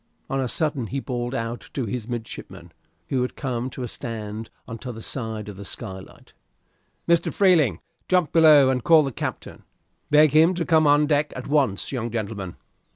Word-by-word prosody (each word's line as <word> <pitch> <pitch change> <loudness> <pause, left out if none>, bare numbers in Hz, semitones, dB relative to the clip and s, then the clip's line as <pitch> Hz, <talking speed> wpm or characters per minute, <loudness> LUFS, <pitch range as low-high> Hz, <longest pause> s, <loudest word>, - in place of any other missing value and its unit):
On 135 - 0
a 130 - -1
sudden 140 -3 -1
he 135 - -3
bawled 120 -1 -3
out 115 0 -4
to 135 - -1
the 100 - -5
two 115 +1 -13
midshipmen, 120 -2 -7 0.4
who 130 - +1
had 125 - -2
come 125 -2 -3
to 130 - -7
a - - -3
stand 110 -2 -6 0.2
on 115 0 -7
t'other 120 -2 -7
side 110 -3 -4
the 100 -1 -8
skylight 95 -2 -8 0.7
"Mr. 170 -1 +3
Freeling, 160 - +3 0.3
jump 180 -4 +2
below 155 -5 +7
and 125 -2 -1
call 160 -2 +6
the 135 - -2
captain. - - -6 0.5
Beg 150 0 +6
him 160 +5 +5
to 170 -1 -2
come 160 -2 +4
on 145 +1 +5
deck 150 0 +1
at 125 - -6
once, 140 -9 +1
young 120 -3 -3
gentleman." 100 -5 -4
125 Hz, 180 wpm, -24 LUFS, 115-150 Hz, 0.7 s, below